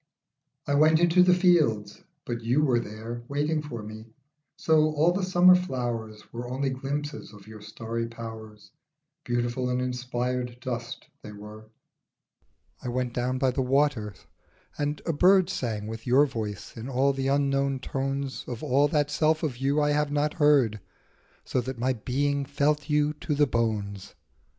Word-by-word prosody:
I 140 - -1
WENT 155 +2 +5
into 175 +1 +4
the 180 0 +5
fields, 150 - +2 0.2
but 120 -1 -4
you 125 +6 +1
were 125 -5 +3
there 115 +2 -7
Waiting 150 +2 0
for 120 -7 -7
me, 110 +1 -9 0.5
so 155 -1 +3
all 160 +4 +4
the 190 +3 -1
summer 185 0 +6
flowers 120 -11 -3
Were 120 +1 -5
only 135 +2 -1
glimpses 145 +3 -4
of 100 -2 -14
your 110 -1 -11
starry 115 +2 -4
powers; 110 -2 -10 0.5
Beautiful 120 +1 -1
and 125 0 0
inspired 125 -1 -3
dust 120 -1 -5 0.2
they 105 - -9
were. 105 +1 -11 1.1
I - - -7
went 125 0 -2
down 125 +1 -1
by 130 0 +2
the 135 +2 -1
waters, 130 -6 0 0.5
and 145 0 -3
a 165 - 0
bird 185 +3 +4
Sang 110 -4 -3
with 115 +2 -7
your 135 +4 +5
voice 110 -7 -6
in 115 +3 -7
all 135 +2 +2
the 135 0 -2
unknown 140 -1 +1
tones 135 +1 -3
Of 120 +1 -6
all 140 0 +3
that 145 -1 0
self 155 +1 +1
of 140 -6 -2
you 140 +3 +1
I 145 0 +2
have 150 0 +1
not 145 +1 0
heard, 135 -8 +4 0.7
So 130 - 0
that 130 +1 -6
my 130 +3 +1
being 140 +4 -1
felt 145 +2 0
you 150 0 +2
to 150 - -1
the 145 +1 +4
bones. 105 -5 -2
130 Hz, 165 wpm, -27 LUFS, 115-145 Hz, 1.1 s, summer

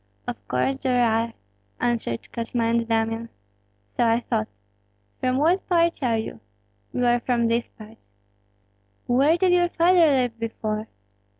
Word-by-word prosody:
"Of 100 -4 -7
course 265 - -1
there 250 -2 +2
are!" 225 0 0 0.5
answered 230 - -1
Kosma 230 0 -2
and 230 0 +1
Damian. 225 0 -1 0.7
"So - - +2
I 230 0 +3
thought. 110 - -1 0.7
From 255 0 0
what 335 +7 +1
parts 340 -2 +2
are 235 -4 +1
you?" 220 - -5 0.5
"We 250 - -2
are 240 0 +3
from 240 -1 0
these 230 +1 0
parts." 220 +1 -15 1.0
"Where 275 +7 +3
did 370 0 +2
your 350 -1 +3
father 345 0 +4
live 250 -5 +1
before?" 220 -1 -3
235 Hz, 140 wpm, -24 LUFS, 225-270 Hz, 1.0 s, father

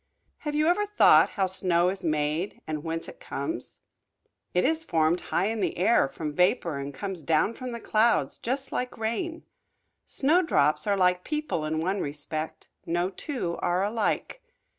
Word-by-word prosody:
Have 295 -2 -4
you 305 +1 +2
ever 360 +5 +2
thought 415 - +6
how 195 - +3
snow 180 -2 +2
is 190 0 -4
made, 155 +3 -1
and 155 -1 -4
whence 165 0 -4
it - - -11
comes? - - -5 0.7
It 180 - +2
is 320 +3 +2
formed 165 - +1
high 180 - 0
in 220 +1 -1
the 195 - -1
air, 185 -6 +3
from 150 +2 -5
vapor, 175 - +1
and 140 +1 -5
comes 180 +5 -5
down 160 +8 +2
from 255 +1 -6
the 235 - -5
clouds, 225 +1 +2
just 265 +3 -3
like 250 0 -3
rain. 320 +10 -3 0.6
Snowdrops 280 - +2
are 200 -1 +2
like 180 -1 +2
people 300 - -2
in 155 +1 -1
one 190 +4 -1
respect, 155 +2 -5 0.2
no 175 +3 -1
two 190 - -4
are 175 +2 0
alike. 220 - -1
185 Hz, 165 wpm, -27 LUFS, 160-245 Hz, 0.7 s, thought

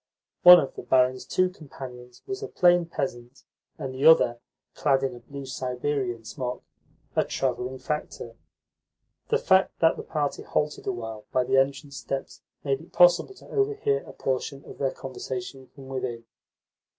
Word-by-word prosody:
One 180 0 +11
of 135 - -3
the - - -7
barin's 130 0 +2
two 185 0 +2
companions 125 -7 -11
was 390 +1 -5
a 420 - -4
plain 175 - +4
peasant, 125 -4 -5 0.3
and 130 -1 -5
the 130 +2 +2
other 120 -7 +6 0.3
(clad 135 -2 +2
in 135 -2 -1
a 120 - -10
blue 140 +3 -9
Siberian 125 -2 -3
smock) 125 -1 -5 0.5
a - - +4
travelling 130 0 -2
factor. 130 -5 -5 0.9
The - - +3
fact 190 0 +3
that 165 -1 +4
the - - -6
party 145 -3 -2
halted 150 0 -2
awhile 110 -4 -5
by 130 - +2
the 130 +1 +1
entrance 135 +1 0
steps 135 +4 -5 0.2
made 135 0 0
it 165 - -16
possible 175 - +5
to - - -16
overhear 425 +1 +1
a - - -12
portion 135 +1 -3
of - - -12
their 135 - +1
conversation 130 0 -7
from 135 -1 -14
within. 125 -3 -4
135 Hz, 160 wpm, -26 LUFS, 125-155 Hz, 0.9 s, One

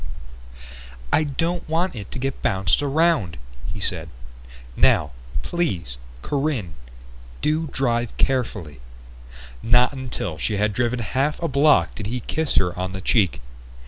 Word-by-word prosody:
"I 155 - +5
don't 165 +4 -2
want 170 +4 +1
it 100 -4 -7
to - - -5
get 135 +1 -3
bounced 95 +8 +2
around," 145 - +2 0.3
he - - -6
said. - - 0 0.7
"Now, - - +4 0.3
please, 85 - -2 0.2
Corinne, 135 - -1 0.7
do 155 +1 +1
drive 120 -5 -1
carefully." 105 - -1 0.8
Not 120 +3 +4
until 120 - -4
she 105 +6 0
had 105 0 +1
driven 120 +3 0
half 130 +6 0
a 170 - -1
block 145 +1 +4
did 105 - -5
he 125 +3 -3
kiss 155 +6 -1
her 90 -1 +2
on 95 +1 -3
the 95 - -5
cheek. 95 - +2
125 Hz, 135 wpm, -23 LUFS, 100-150 Hz, 0.8 s, I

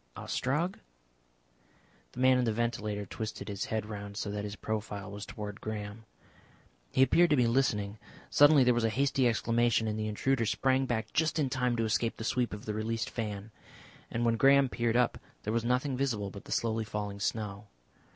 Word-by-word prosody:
"Ostrog?" 150 +8 -1 1.3
The - - -8
man 130 0 +5
in 125 - +1
the 115 - +1
ventilator 105 -2 -2
twisted 110 +2 -6
his 100 +1 -3
head 110 -5 -2
round 100 -1 -7
so 105 - -3
that 105 0 -3
his 105 0 -5
profile 105 -2 -4
was 100 0 -7
towards 105 -3 -6
Graham. 105 0 -6 0.9
He 130 - +5
appeared 170 +7 +4
to 150 - +4
be 125 -3 +3
listening. 110 -4 +1 0.3
Suddenly 145 -1 +7
there 125 0 +4
was 120 -1 0
a 115 - +3
hasty 135 +2 +2
exclamation, 115 0 +2
and 110 0 -2
the 110 - -1
intruder 115 +2 0
sprang 130 +2 +2
back 110 -2 -2
just 160 -1 +1
in 140 -4 0
time 125 -2 +1
to 115 -1 0
escape 115 +1 0
the - - -5
sweep 120 +1 0
of 105 0 -7
the 105 - -2
released 110 +1 -2
fan. 105 -2 -4 0.6
And 120 +1 -1
when 115 -1 +2
Graham 135 +1 +5
peered 120 -1 0
up 125 -1 +2 0.2
there 105 - -2
was 115 -1 +1
nothing 125 +3 +1
visible 115 -7 -1
but 100 - -10
the - - -11
slowly 115 -1 0
falling 105 -2 -4
snow. 105 -1 -3
115 Hz, 190 wpm, -31 LUFS, 105-125 Hz, 1.3 s, Suddenly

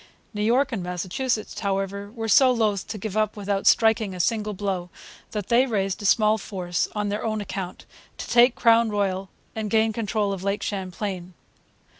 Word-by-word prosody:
New 210 - -3
York 250 +6 +2
and 225 -6 -2
Massachusetts, 185 +7 -3
however, 200 0 -2
were 225 -1 -5
so 260 +5 +6
loth 215 -5 0
to 220 - -5
give 210 0 -5
up 215 -1 0
without 200 -1 -1
striking 220 -3 +3
a - - -8
single 210 +2 0
blow 190 -3 -3 0.4
that 210 -3 -5
they 245 +3 +4
raised 195 -3 -1
a - - -6
small 215 +1 +4
force, 180 -4 -2
on 210 -1 -1
their 205 +1 -3
own 215 -1 -1
account, 190 -3 -6 0.3
to - - -6
take 240 +1 +5
Crown 230 -1 +4
Point 195 -2 -1 0.3
and 220 -1 -3
gain 220 +1 +2
control 210 -2 -1
of 190 - -6
Lake 200 +1 -1
Champlain. 185 -2 -4
210 Hz, 180 wpm, -24 LUFS, 195-220 Hz, 0.4 s, so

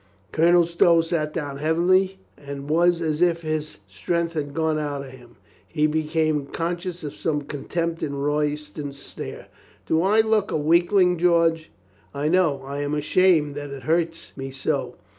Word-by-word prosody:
Colonel 170 +2 +4
Stow 170 0 +4
sat 165 -2 -2
down 145 -4 -4
heavily 180 +5 +2 0.2
and 140 -1 -8
was 170 +2 +3
as 155 0 -1
if 170 -1 +2
his 155 -1 -3
strength 165 - -2
had 145 -3 -3
gone 160 -1 +1
out 145 -2 -3
of 135 - -10
him. 120 -2 -16 0.3
He 150 -2 0
became 155 -1 0
con 170 +4 -2
scious 175 -1 -7
of 145 -1 -5
some 150 -2 -2
contempt 165 +4 -3
in 140 - -3
Royston's 150 0 -2
stare. - - -8 0.4
"Do 160 - +2
I 205 +4 +4
look 220 -2 +1
a - - 0
weakling, 175 +3 +3
George? 165 -2 +2 0.5
I 145 +2 0
know. 160 -6 +2
I 140 +1 -5
am 145 +1 -1
ashamed 155 0 +3
that 145 0 -6
it 140 -2 -8
hurts 165 +3 -1
me 135 0 -6
so. 135 0 -2
155 Hz, 165 wpm, -24 LUFS, 145-170 Hz, 0.5 s, Colonel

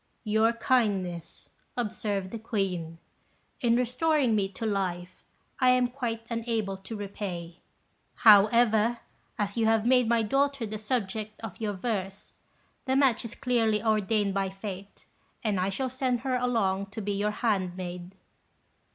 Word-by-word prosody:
"Your 220 +1 +3
kindness," 200 -8 -1 0.3
observed 205 -4 -2
the 230 - -5
Queen, 185 -7 -2 0.6
"in 235 -1 +3
restoring 255 +2 +2
me 195 -2 +1
to 200 +4 -6
life, 185 -3 -2 0.4
I 255 - +5
am 250 -1 +4
quite 240 -3 -3
unable 230 -4 -2
to 195 +4 -8
repay; 190 -4 -6 0.6
however, 220 +2 +5 0.4
as 205 0 -2
you 225 -1 +3
have 225 -1 +3
made 250 -2 +4
my 235 -1 +3
daughter 275 +2 +1
the 215 0 -5
subject 215 -1 -3
of 225 -1 -8
your 210 -2 -1
verse, 195 -2 -4 0.5
the 265 -1 +1
match 265 -4 +3
is 230 -1 -7
clearly 225 -5 +1
ordained 215 -2 +1
by 195 -1 0
fate, 195 0 -8 0.4
and 210 -4 0
I 185 +1 +1
shall 260 +7 -2
send 255 -2 -1
her 260 0 0
along 220 -6 0
to 205 +2 -7
be 205 0 -2
your 205 +1 0
handmaid." 185 -4 -2
215 Hz, 145 wpm, -28 LUFS, 195-235 Hz, 0.6 s, I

